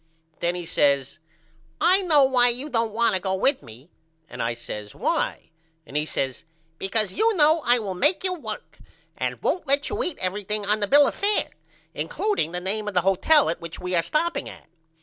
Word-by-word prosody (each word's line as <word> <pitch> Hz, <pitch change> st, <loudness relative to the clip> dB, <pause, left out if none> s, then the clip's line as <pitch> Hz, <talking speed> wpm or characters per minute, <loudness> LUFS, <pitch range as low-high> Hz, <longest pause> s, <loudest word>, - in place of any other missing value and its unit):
Then 175 Hz, +1 st, -1 dB
he 175 Hz, -1 st, -5 dB
says 140 Hz, -3 st, +1 dB, 0.6 s
I 370 Hz, +3 st, +4 dB
know 310 Hz, -6 st, +5 dB
why 250 Hz, -2 st, +4 dB
you 260 Hz, +5 st, -4 dB
don't 230 Hz, -2 st, 0 dB
want 230 Hz, 0 st, +2 dB
to 185 Hz, -, -1 dB
go 190 Hz, 0 st, -1 dB
with 265 Hz, +8 st, +1 dB
me 125 Hz, +6 st, -15 dB, 0.4 s
and -, -, -7 dB
I 115 Hz, 0 st, -1 dB
says 105 Hz, -3 st, -8 dB
Why? -, -, -2 dB, 0.3 s
And 135 Hz, -, -13 dB
he 150 Hz, +1 st, 0 dB
says 135 Hz, -4 st, -3 dB, 0.4 s
Because 205 Hz, 0 st, 0 dB
you 440 Hz, +1 st, +2 dB
know 315 Hz, 0 st, +4 dB
I 245 Hz, +1 st, +4 dB
will 205 Hz, -5 st, -3 dB
make 295 Hz, -, +1 dB
you 370 Hz, -1 st, +1 dB
work 350 Hz, -, -7 dB, 0.4 s
and -, -, -3 dB
won't 355 Hz, -4 st, -1 dB
let 280 Hz, +1 st, +2 dB
you 420 Hz, +3 st, -3 dB
eat 360 Hz, -, -2 dB
everything 205 Hz, +2 st, -2 dB
on 210 Hz, +2 st, +1 dB
the 205 Hz, -, -1 dB
bill 290 Hz, +5 st, +6 dB
of -, -, -1 dB
fair 410 Hz, +1 st, 0 dB, 0.4 s
includeing 415 Hz, -, -2 dB
the 180 Hz, -, -4 dB
name 210 Hz, +4 st, -2 dB
of 205 Hz, -, -4 dB
the 180 Hz, -, +4 dB
hotel 195 Hz, -, +3 dB
at 165 Hz, -, -2 dB
which 170 Hz, -1 st, -8 dB
we 180 Hz, 0 st, -4 dB
are 170 Hz, -, +3 dB
stopping 335 Hz, -, -1 dB
at. -, -, -13 dB
215 Hz, 205 wpm, -24 LUFS, 180-295 Hz, 0.6 s, bill